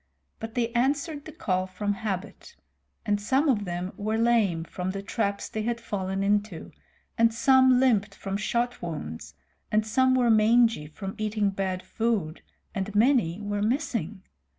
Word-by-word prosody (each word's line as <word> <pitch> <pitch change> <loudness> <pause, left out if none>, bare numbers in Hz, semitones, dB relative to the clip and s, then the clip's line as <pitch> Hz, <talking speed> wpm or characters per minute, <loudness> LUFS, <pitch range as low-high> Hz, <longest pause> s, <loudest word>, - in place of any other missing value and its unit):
But 225 0 -7
they 235 -2 +1
answered 285 +5 0
the 315 - -8
call 185 -9 -1
from 205 +2 -2
habit; 210 - -5 0.5
and 205 -2 0
some 265 +8 +2
of 215 -7 +2
them 175 +1 -4
were 215 +2 -1
lame 225 -8 +2
from 180 +2 -5
the 195 +1 -4
traps 200 -1 -2
they 220 - -4
had 235 +2 -2
fallen 195 -3 -3
into, 205 -3 -1 0.5
and 230 0 +5
some 260 +2 +5
limped 215 -6 +2
from 195 0 -5
shot 235 +4 -1
wounds, 80 - -6 0.4
and 215 0 +2
some 260 +4 +3
were 245 -2 +3
mangy 225 -6 +4
from 195 +5 -7
eating 215 -1 0
bad 190 -1 -3
food, 215 -9 -2 0.3
and 195 +1 -4
many 215 -6 +3
were 205 0 -2
missing. 220 - -2
210 Hz, 155 wpm, -27 LUFS, 195-235 Hz, 0.5 s, and